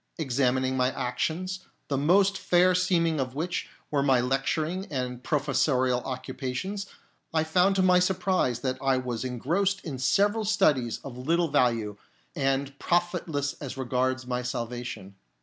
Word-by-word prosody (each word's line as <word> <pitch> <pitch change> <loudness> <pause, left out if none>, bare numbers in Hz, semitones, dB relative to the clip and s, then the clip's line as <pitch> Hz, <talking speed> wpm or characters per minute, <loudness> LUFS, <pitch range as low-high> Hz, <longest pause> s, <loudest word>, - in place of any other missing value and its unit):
Examining 130 -3 +1
my 125 0 +2
actions, 180 +9 -2 0.2
the 140 - -1
most 190 +8 +3
fair 180 -1 +3
seeming 170 -3 +2
of 130 -1 -3
which 175 +4 -3 0.2
were 145 -2 +2
my 135 -2 +4
lecturing 155 +8 -1
and 125 -3 -4
professorial 130 -3 +1
occupa 130 0 -5
tions, 195 +7 -4 0.4
I 160 -1 +2
found 180 +5 +3
to 190 - +3
my 180 -1 +5
surprise 180 -9 +1
that 130 0 -2
I 135 -1 +2
was 125 -2 -3
engrossed 170 - -1
in 140 -6 -5
several 205 - +2
studies 145 - +2
of 125 -2 -8
little 165 +5 +1
value, 115 -7 +1 0.4
and 135 -1 -1
profitless 175 -5 0
as 135 -2 -6
regards 130 0 -1
my 125 0 -2
salvation. 120 -5 -5
140 Hz, 145 wpm, -27 LUFS, 125-175 Hz, 0.4 s, my